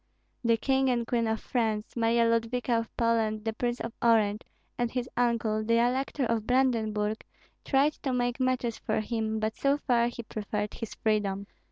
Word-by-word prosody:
The 230 Hz, -1 st, +3 dB
King 265 Hz, +2 st, +2 dB
and 240 Hz, -2 st, +1 dB
Queen 230 Hz, -1 st, 0 dB
of 220 Hz, 0 st, 0 dB
France, 220 Hz, -3 st, -2 dB
Marya 230 Hz, 0 st, +3 dB
Ludvika 230 Hz, +1 st, 0 dB
of 230 Hz, -, -7 dB
Poland, 225 Hz, -2 st, +1 dB
the 225 Hz, -, -1 dB
Prince 240 Hz, +2 st, -2 dB
of 230 Hz, -, -4 dB
Orange, 220 Hz, -2 st, +3 dB, 0.3 s
and 240 Hz, -1 st, 0 dB
his 250 Hz, 0 st, -3 dB
uncle, 230 Hz, -3 st, +1 dB
the 230 Hz, +1 st, +2 dB
Elector 255 Hz, +3 st, +1 dB
of 225 Hz, -2 st, -1 dB
Brandenburg, 220 Hz, -5 st, +1 dB, 0.4 s
tried 280 Hz, +2 st, +3 dB
to 270 Hz, -, -1 dB
make 245 Hz, 0 st, 0 dB
matches 255 Hz, -3 st, 0 dB
for 215 Hz, -, -1 dB
him; 220 Hz, 0 st, -2 dB
but 215 Hz, 0 st, -1 dB
so 280 Hz, +1 st, +2 dB
far 240 Hz, -5 st, +2 dB
he 240 Hz, 0 st, -6 dB
preferred 210 Hz, -1 st, -4 dB
his 225 Hz, -, -6 dB
freedom. 200 Hz, -2 st, 0 dB
230 Hz, 175 wpm, -29 LUFS, 220-245 Hz, 0.4 s, The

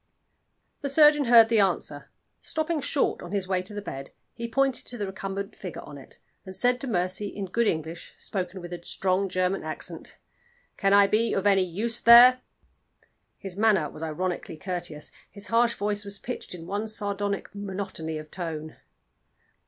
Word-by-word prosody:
The 280 Hz, -, -2 dB
surgeon 295 Hz, 0 st, +6 dB
heard 230 Hz, -2 st, +7 dB
the 225 Hz, -2 st, +3 dB
answer. 170 Hz, -6 st, 0 dB, 0.3 s
Stopping 315 Hz, 0 st, -1 dB
short 280 Hz, -, 0 dB
on 175 Hz, -, -8 dB
his 195 Hz, -2 st, 0 dB
way 185 Hz, -1 st, 0 dB
to 185 Hz, +4 st, -7 dB
the 205 Hz, -, -5 dB
bed, 135 Hz, -7 st, -7 dB, 0.2 s
he 235 Hz, 0 st, -5 dB
pointed 270 Hz, +2 st, +1 dB
to 245 Hz, -, -5 dB
the 205 Hz, -, -2 dB
recumbent 195 Hz, +2 st, -5 dB
figure 180 Hz, -5 st, -7 dB
on 145 Hz, -1 st, -10 dB
it, 135 Hz, -, -13 dB, 0.3 s
and 190 Hz, -1 st, -8 dB
said 245 Hz, +2 st, +3 dB
to 275 Hz, -, -4 dB
Mercy, 185 Hz, -1 st, 0 dB
in 200 Hz, 0 st, -5 dB
good 230 Hz, +5 st, 0 dB
English, 160 Hz, 0 st, -3 dB
spoken 185 Hz, -1 st, -4 dB
with 175 Hz, 0 st, -8 dB
a 175 Hz, -, -7 dB
strong 190 Hz, +2 st, 0 dB
German 185 Hz, +1 st, 0 dB
accent. -, -, -5 dB, 0.6 s
"Can 195 Hz, -, +1 dB
I 200 Hz, 0 st, +7 dB
be 220 Hz, +3 st, +1 dB
of 195 Hz, -, -1 dB
any 195 Hz, -2 st, +5 dB
use 215 Hz, +7 st, -2 dB
there?" 245 Hz, +2 st, +8 dB, 1.0 s
His 195 Hz, -2 st, -6 dB
manner 205 Hz, -8 st, +3 dB
was -, -, -10 dB
ironically 165 Hz, +1 st, -3 dB
courteous, 175 Hz, -3 st, -5 dB, 0.2 s
his 200 Hz, -1 st, -7 dB
harsh 235 Hz, +1 st, +3 dB
voice 205 Hz, 0 st, -1 dB
was 200 Hz, 0 st, -5 dB
pitched 245 Hz, -4 st, -6 dB
in 165 Hz, -2 st, -9 dB
one 205 Hz, +4 st, -3 dB
sardonic 205 Hz, -2 st, -2 dB
monotony 190 Hz, -5 st, -4 dB
of 155 Hz, 0 st, -9 dB
tone. 160 Hz, -4 st, -5 dB
200 Hz, 175 wpm, -26 LUFS, 180-225 Hz, 1.0 s, there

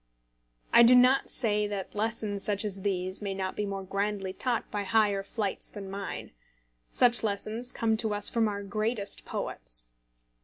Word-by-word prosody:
I -, -, +8 dB
do 240 Hz, +2 st, +8 dB
not 255 Hz, +2 st, +5 dB
say 210 Hz, -3 st, +2 dB
that 200 Hz, -2 st, -5 dB
lessons 210 Hz, -2 st, -2 dB
such 205 Hz, 0 st, +1 dB
as 195 Hz, -2 st, -3 dB
these 185 Hz, -1 st, -1 dB
may 200 Hz, -2 st, -3 dB
not 190 Hz, -1 st, -3 dB
be 210 Hz, -, -2 dB
more 195 Hz, -1 st, -4 dB
grandly 195 Hz, 0 st, -2 dB
taught 240 Hz, +3 st, -1 dB
by 205 Hz, -, -2 dB
higher 205 Hz, -1 st, +2 dB
flights 200 Hz, 0 st, -3 dB
than 195 Hz, -2 st, -8 dB
mine. 200 Hz, 0 st, -5 dB, 0.6 s
Such 240 Hz, -1 st, +5 dB
lessons 220 Hz, +3 st, -2 dB
come 225 Hz, -1 st, 0 dB
to 220 Hz, -2 st, +1 dB
us 205 Hz, 0 st, +5 dB
from 230 Hz, -2 st, +3 dB
our 200 Hz, -1 st, -4 dB
greatest 215 Hz, +1 st, -3 dB
poets. -, -, -5 dB
205 Hz, 165 wpm, -29 LUFS, 195-220 Hz, 0.6 s, I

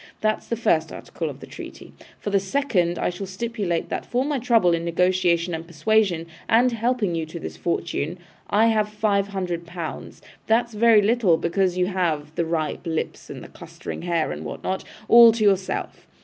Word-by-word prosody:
That's 215 Hz, 0 st, 0 dB
the 235 Hz, -, -1 dB
first 165 Hz, -8 st, +1 dB
article -, -, -5 dB
of -, -, -10 dB
the -, -, -8 dB
treaty. -, -, -10 dB, 0.2 s
For 205 Hz, -, -5 dB
the 200 Hz, -, +4 dB
second, 190 Hz, -5 st, 0 dB
I -, -, 0 dB
shall 190 Hz, +2 st, -6 dB
stipulate 195 Hz, -3 st, -3 dB
that -, -, -3 dB
for 250 Hz, +2 st, -1 dB
my 290 Hz, -2 st, -1 dB
trouble 230 Hz, -8 st, +3 dB
in 165 Hz, 0 st, -1 dB
negotiation 175 Hz, 0 st, +1 dB
and 165 Hz, +1 st, -5 dB
persuasion, 185 Hz, 0 st, +1 dB, 0.2 s
and 245 Hz, +3 st, +4 dB
helping 230 Hz, -4 st, 0 dB
you 165 Hz, -1 st, -2 dB
to 170 Hz, +2 st, -7 dB
this -, -, -7 dB
fortune, 170 Hz, -1 st, -2 dB, 0.3 s
I 215 Hz, +2 st, +4 dB
have 215 Hz, -2 st, +1 dB
five 210 Hz, -2 st, 0 dB
hundred 180 Hz, -4 st, -4 dB
pounds. 170 Hz, -2 st, -7 dB, 0.3 s
That's 235 Hz, +1 st, +2 dB
very 215 Hz, -1 st, +5 dB
little, 210 Hz, -6 st, +3 dB
because 180 Hz, +2 st, 0 dB
you 180 Hz, -, +2 dB
have 165 Hz, -6 st, -1 dB
the 170 Hz, -, -1 dB
ripe 160 Hz, +1 st, -2 dB
lips, 160 Hz, -1 st, -3 dB
and -, -, -8 dB
the -, -, -10 dB
clustering -, -, -8 dB
hair, 170 Hz, -, 0 dB
and 75 Hz, +1 st, -6 dB
what 75 Hz, -, -7 dB
not, 190 Hz, 0 st, -2 dB, 0.2 s
all 235 Hz, 0 st, +9 dB
to 225 Hz, -1 st, -1 dB
yourself. 195 Hz, -2 st, 0 dB
185 Hz, 190 wpm, -23 LUFS, 170-220 Hz, 0.3 s, all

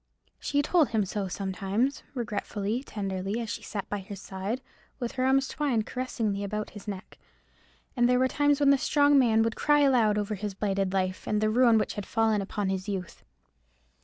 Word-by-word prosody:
She 285 Hz, 0 st, 0 dB
told 325 Hz, -1 st, +3 dB
him 215 Hz, -3 st, +1 dB
so 195 Hz, +1 st, -3 dB
sometimes, 195 Hz, +7 st, -1 dB
regretfully, 220 Hz, -1 st, -2 dB
tenderly, 195 Hz, -3 st, -3 dB
as 230 Hz, -3 st, -4 dB
she -, -, -5 dB
sat 200 Hz, -3 st, -5 dB
by 205 Hz, -, -3 dB
his 195 Hz, 0 st, -8 dB
side, 195 Hz, +5 st, -4 dB, 0.4 s
with 240 Hz, -3 st, -3 dB
her 255 Hz, -1 st, -1 dB
arms 270 Hz, 0 st, +3 dB
twined 255 Hz, -8 st, 0 dB
caressingly 225 Hz, -6 st, -2 dB
about 210 Hz, +1 st, -3 dB
his 205 Hz, 0 st, -11 dB
neck. 195 Hz, -2 st, -7 dB, 0.8 s
And 240 Hz, -1 st, +3 dB
there 250 Hz, -, +4 dB
were 260 Hz, +1 st, +3 dB
times 290 Hz, +1 st, +2 dB
when 280 Hz, -1 st, +5 dB
the 280 Hz, -, +4 dB
strong 285 Hz, 0 st, +4 dB
man 225 Hz, -3 st, +4 dB
would 225 Hz, 0 st, -1 dB
cry 295 Hz, 0 st, +3 dB
aloud 240 Hz, -7 st, +4 dB
over 210 Hz, +1 st, -1 dB
his 205 Hz, -1 st, -4 dB
blighted 195 Hz, -2 st, 0 dB
life, 185 Hz, -1 st, -1 dB
and 210 Hz, -, +1 dB
the 215 Hz, 0 st, +2 dB
ruin 235 Hz, -1 st, +5 dB
which 215 Hz, -, 0 dB
had 205 Hz, -, -6 dB
fallen 225 Hz, -2 st, +2 dB
upon 200 Hz, 0 st, -2 dB
his 190 Hz, +1 st, -3 dB
youth. 190 Hz, -3 st, -5 dB
215 Hz, 190 wpm, -28 LUFS, 200-255 Hz, 0.8 s, when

